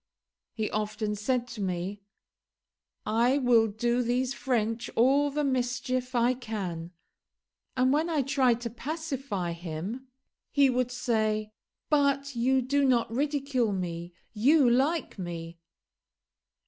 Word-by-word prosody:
He 220 -2 -1
often 215 0 -2
said 245 +4 -1
to 220 - -7
me, 185 +2 -3 1.0
"I 240 +5 +3
will 240 -4 +4
do 235 +4 0
these 250 +2 0
French 230 -4 -1
all 275 +5 +4
the 295 +1 -1
mischief 255 -1 -1
I 240 +1 +3
can;" 195 -9 -5 0.9
and 255 +1 +3
when 315 +3 +1
I 305 -4 +1
tried 255 -3 +2
to 235 -2 -4
pacify 270 - -4
him 175 +9 -6 0.4
he 275 -2 +4
would 250 0 0
say, 220 -4 0 0.4
"But 280 -2 +2
you 260 +2 +2
do 280 +3 +1
not 245 -4 +2
ridicule 275 -4 0
me; 175 -2 -4 0.2
you 270 +6 +4
like 265 +1 +1
me." 170 -1 -6
245 Hz, 120 wpm, -28 LUFS, 215-270 Hz, 1.0 s, will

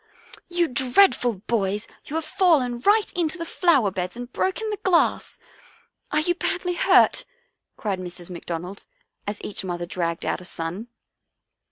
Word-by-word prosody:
" - - -15
You 340 - +4
dreadful 250 - +3
boys, 205 -1 -1 0.2
you 300 - -6
have 320 -1 -1
fallen 300 -9 +2
right 415 - +3
into 345 -1 -1
the 335 - -4
flower 305 - +3
beds 180 +4 -4
and 245 0 -8
broken 430 +3 -1
the 420 - -3
glass! 365 -3 +1 0.7
Are 305 - +3
you 350 +3 +2
badly 355 0 -1
hurt?" 345 - +4 0.5
cried 200 -4 -2
Mrs. 180 0 -8
McDonald, 175 +2 -6 0.4
as 205 0 -2
each 200 - -4
mother 175 -2 -3
dragged 170 -1 -3
out - - -1
a - - -12
son. 175 +6 -5
240 Hz, 155 wpm, -24 LUFS, -, 0.7 s, You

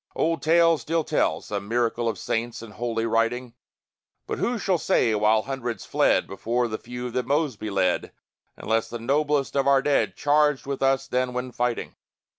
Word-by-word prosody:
Old 165 +1 0
tales 165 -1 +4
still 165 +6 0
tell 80 - 0
some 100 -1 -5
miracle 120 0 0
Of - - -4
saints 115 0 -3
in 115 - -10
holy 115 0 -2
writing 115 +2 0 0.7
But - - -4
who 245 0 0
shall 190 -4 0
say 115 -5 +2
while 110 +1 +3
hundreds 125 -5 -4
fled - - +2
Before 120 +5 -1
the 110 -1 -4
few 125 +1 -6
that 125 0 -2
Mosby 140 -7 -1
led, 95 -3 0 0.5
Unless 110 0 -1
the 120 - -5
noblest 140 +4 0
of 140 -1 +2
our 135 -1 +4
dead 145 -1 +1
Charged 150 -1 +2
with 140 0 -4
us 135 -1 +2
then 125 0 -1
when 125 0 -3
fighting? 120 -1 -2
125 Hz, 175 wpm, -25 LUFS, 115-140 Hz, 0.7 s, tales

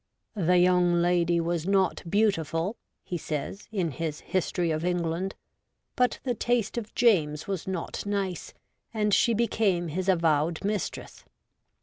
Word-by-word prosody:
' - - -48
The 180 0 +5
young 180 0 +4
lady 175 0 +2
was 170 0 -1
not 195 -2 +2
beautiful,' 185 -2 +1 0.3
he 175 - -4
says, 155 +7 -5
in 185 -7 -1
his 150 +3 -4
History 175 -2 -1
of 155 +1 -2
England, 175 +1 -1 0.3
' - - -53
but 250 -2 +2
the 250 - 0
taste 235 -1 0
of 230 -2 -5
James 155 -10 +2
was 195 -3 -3
not 185 -3 -4
nice, 200 -4 -3 0.4
and 210 -1 +1
she 230 +3 +4
became 200 -6 +1
his 185 +5 -2
avowed 165 -2 +2
mistress. 205 -2 -3
180 Hz, 145 wpm, -27 LUFS, 165-200 Hz, 0.4 s, The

